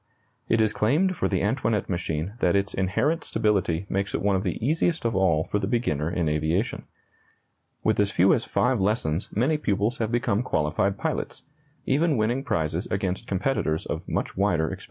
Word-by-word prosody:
It 115 0 +3
is 110 -1 +2
claimed 155 - +2
for - - 0
the 95 -2 0
Antoinette 110 -2 0
machine 85 0 -2
that 90 - +2
its 100 0 0
inherent 100 - 0
stability 95 -4 0
makes 95 0 -2
it - - -1
one 100 -1 +3
of 95 - +1
the - - -2
easiest 165 +1 +1
of 115 -3 0
all 85 -5 +3
for 105 - -1
the 95 - -2
beginner 100 - 0
in 85 -2 -1
aviation. 80 +7 -1 1.0
With 110 -1 +2
as 100 -1 +3
few 95 -1 +4
as 115 - +1
five 125 -4 +1
lessons 95 -5 0
many 140 +8 +1
pupils 105 -1 0
have 110 -1 -1
become 120 -3 +1
qualified 95 -1 0
pilots, - - -3 0.4
even 150 +1 +2
winning 120 +5 0
prizes 85 - -1
against 95 -1 -2
competitors 95 -6 -1
of - - -5
much - - -2
wider 90 -5 +1
experience. - - -6
100 Hz, 180 wpm, -25 LUFS, 90-120 Hz, 1.0 s, few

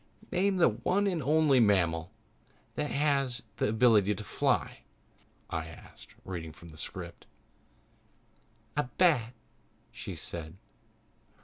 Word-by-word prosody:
"Name 190 +2 +2
the 180 - +5
one 180 - 0
and 180 -5 0
only 150 -1 +4
mammal 90 -6 +2 0.6
that 150 -1 -2
has 140 -4 +1
the - - +1
ability 110 -3 +4
to 105 - -7
fly," - - 0 0.7
I 80 -1 -3
asked, 80 - -14
reading 85 -4 -5
from 85 - -13
the 80 - -13
script. - - -7 1.5
"A 150 - +1
bat," 125 -10 +3 0.6
she - - -7
said. 80 -1 -5
120 Hz, 115 wpm, -30 LUFS, 90-150 Hz, 1.5 s, the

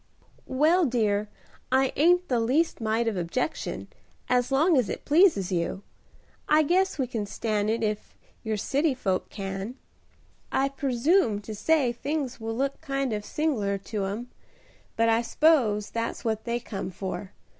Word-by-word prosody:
"Well, 315 +7 +3
dear, 215 -4 0 0.4
I 265 0 +3
ain't 355 +4 +4
the 245 -3 +1
least 265 +6 +1
mite 225 +1 0
of 225 - 0
objection, 180 - -3 0.4
as 250 +1 +2
long 310 +5 +4
as 250 -6 +2
it - - -5
pleases 300 - +4
you. 180 +2 -2 0.7
I 305 +1 +5
guess 370 +5 +2
we 265 - +1
can 225 -4 -4
stan' 210 0 -1
it 225 +1 0
ef 210 -1 -3 0.3
your 220 -1 -1
city 280 +7 +1
folks 190 -7 -1
can. 195 +3 -5 0.8
I 275 +1 +2
presume 275 - +2
to 215 +1 -7
say 265 +4 +2
things 275 +1 -3
will 225 0 -4
look 275 +3 -1
kind 275 -5 -1
of 210 -1 -3
sing'lar 215 -9 -1
to 200 0 -4
'em, 220 +6 -5 0.6
but 230 0 +3
I 225 0 +3
s'pose 235 -6 +2
that's 230 +1 -3
what 220 -1 -1
they 235 0 -1
come 195 -5 -5
for. 190 +1 -6
235 Hz, 155 wpm, -27 LUFS, 210-280 Hz, 0.8 s, I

